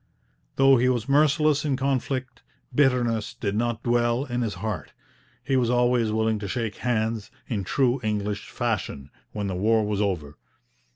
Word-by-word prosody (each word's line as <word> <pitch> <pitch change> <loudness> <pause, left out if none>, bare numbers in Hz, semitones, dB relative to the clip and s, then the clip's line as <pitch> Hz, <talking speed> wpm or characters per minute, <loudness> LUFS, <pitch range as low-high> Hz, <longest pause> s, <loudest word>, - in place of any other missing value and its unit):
Though 135 0 +6
he 125 +2 +3
was 120 -2 -1
merciless 150 +1 +3
in 140 -4 0
conflict, 130 -2 -2 0.3
bitterness 125 -5 +1
did 100 -1 -2
not 120 0 -1
dwell 120 +2 +1
in 120 -2 -2
his 110 -5 -2
heart. 105 +2 -5 0.5
He 135 0 0
was 125 -3 +2
always 120 -2 +2
willing 110 0 +1
to 100 - -5
shake 115 -1 -3
hands, 110 -2 -1 0.2
in 105 -5 -2
true 130 - +1
English 105 -2 -2
fashion, 95 - -3 0.2
when 105 -1 -3
the 95 - -2
war 110 +3 +2
was 105 -1 -1
over. 80 -8 -2
120 Hz, 160 wpm, -25 LUFS, 105-130 Hz, 0.5 s, Though